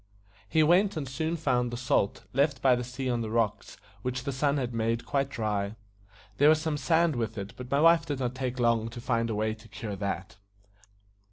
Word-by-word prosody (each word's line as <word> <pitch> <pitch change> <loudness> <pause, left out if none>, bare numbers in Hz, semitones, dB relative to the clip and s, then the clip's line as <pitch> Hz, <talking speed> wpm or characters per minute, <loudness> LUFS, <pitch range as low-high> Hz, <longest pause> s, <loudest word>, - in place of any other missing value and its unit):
He 160 -1 +4
went, 180 +4 +3
and 145 -3 -3
soon 160 +6 -2
found 125 -6 +1
the 120 - -5
salt, 120 -5 0
left 140 +1 +2
by 130 -2 +4
the 125 - -3
sea 125 +2 -5
on 120 -2 0
the 110 - -3
rocks, 110 -2 -1 0.2
which 125 +1 -3
the 140 - -2
sun 140 +2 +1
had 125 -3 -2
made 115 +1 -1
quite 140 -1 0
dry. 105 -4 -2 0.6
There 145 +2 +6
was 155 0 +5
some 160 -1 -1
sand 160 +1 +2
with 115 -2 -3
it, 100 0 -5
but 125 -1 -8
my 140 +2 +2
wife 165 0 +5
did 145 - -2
not 125 -1 -1
take 130 -1 -3
long 115 -2 +2
to 120 +1 -8
find 115 -2 0
a 110 - -1
way 110 +1 0
to 110 +1 -14
cure 105 0 -6
that. 95 -1 -4
125 Hz, 215 wpm, -28 LUFS, 115-140 Hz, 0.6 s, There